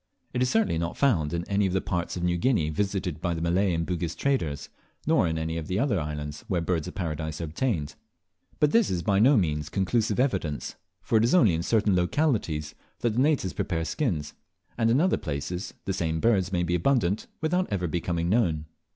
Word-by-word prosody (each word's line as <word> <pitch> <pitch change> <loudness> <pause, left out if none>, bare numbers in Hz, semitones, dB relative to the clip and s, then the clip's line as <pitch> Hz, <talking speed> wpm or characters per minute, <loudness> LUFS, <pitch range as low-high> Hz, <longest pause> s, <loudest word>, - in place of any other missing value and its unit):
It 125 - -1
is 125 - +2
certainly 220 - +2
not 85 0 -3
found 90 - +2
in 85 0 -2
any 100 0 +2
of 90 - -2
the 95 - +2
parts 85 -1 -3
of 90 - -4
New 90 0 +2
Guinea 85 - +1
visited 95 -2 -2
by 85 -1 -1
the - - -3
Malay 90 +4 +2
and 85 -1 -1
Bugis 85 -1 -2
traders, 85 - -1 0.4
nor - - +3
in 80 0 -1
any 80 +1 -2
of 80 -2 -5
the 95 - -1
other 115 -4 +1
islands 75 -1 -5
where 90 - 0
Birds 85 -1 -1
of 90 - -8
Paradise 80 -3 -3
are - - -3
obtained. 80 - -2 0.7
But 150 -1 +3
this 230 -3 +4
is 90 -2 -1
by 100 -2 +2
no 130 +5 +6
means 75 -5 0
conclusive 105 +5 0
evidence, 95 - -1 0.3
for 110 - +3
it - - +2
is 120 +9 +3
only 110 - +5
in 80 - 0
certain 105 +1 +2
localities 90 - 0 0.3
that 120 - +2
the 115 - 0
natives 140 - +1
prepare 80 -3 -2
skins, 85 - -2 0.4
and 115 -1 +2
in 120 +4 +4
other 185 +3 +3
places 85 +6 -4
the 95 - -1
same 80 -3 -1
birds 95 -2 +2
may 90 -2 +1
be 85 0 -1
abundant 100 0 +1
without 180 - 0
ever 95 -3 0
becoming 85 0 -1
known. 85 -7 +1
90 Hz, 210 wpm, -27 LUFS, 80-115 Hz, 0.7 s, no